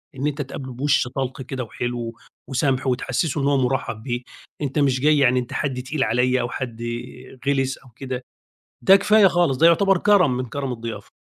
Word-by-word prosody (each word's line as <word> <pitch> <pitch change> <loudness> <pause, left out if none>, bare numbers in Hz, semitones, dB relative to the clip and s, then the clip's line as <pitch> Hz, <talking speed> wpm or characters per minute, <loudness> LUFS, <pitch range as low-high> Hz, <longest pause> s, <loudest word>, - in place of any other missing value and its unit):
إن 135 +2 -1
أنت 150 0 -2
تقابله 130 -1 -7
بِوشّ 135 +1 +1
طَلْقْ 130 +1 -4
كده 130 0 -4
وحلو 120 0 -4 0.3
وسَمْح 135 0 0
وتحسِّسه 130 +4 0
إن - - 0
هو 140 -1 +3
مُرَحبّ 125 -4 -1
بيه، 120 -2 -3 0.4
أنت 140 0 -1
مش 135 -3 +2
جاي 150 +1 +4
يعني 130 -3 +4
أنت 125 0 -6
حد 135 -4 -2
تقيل 135 +2 -1
عليَّ 125 +1 +2
أو 120 - -2
حد 120 -3 -5 0.7
غلِس 135 -1 +1
أو 135 - -19
كده، 130 -1 -5 0.6
ده 195 - +8
كفاية 210 +1 +5
خالص 175 -7 +2
ده 165 - +6
يُعتَبر 195 +3 +4
كَرَم 180 -10 +4
من 130 - -2
كَرَم 135 +2 -4
الضِيَافة. 115 -1 -7
135 Hz, 185 wpm, -22 LUFS, 125-145 Hz, 0.7 s, ده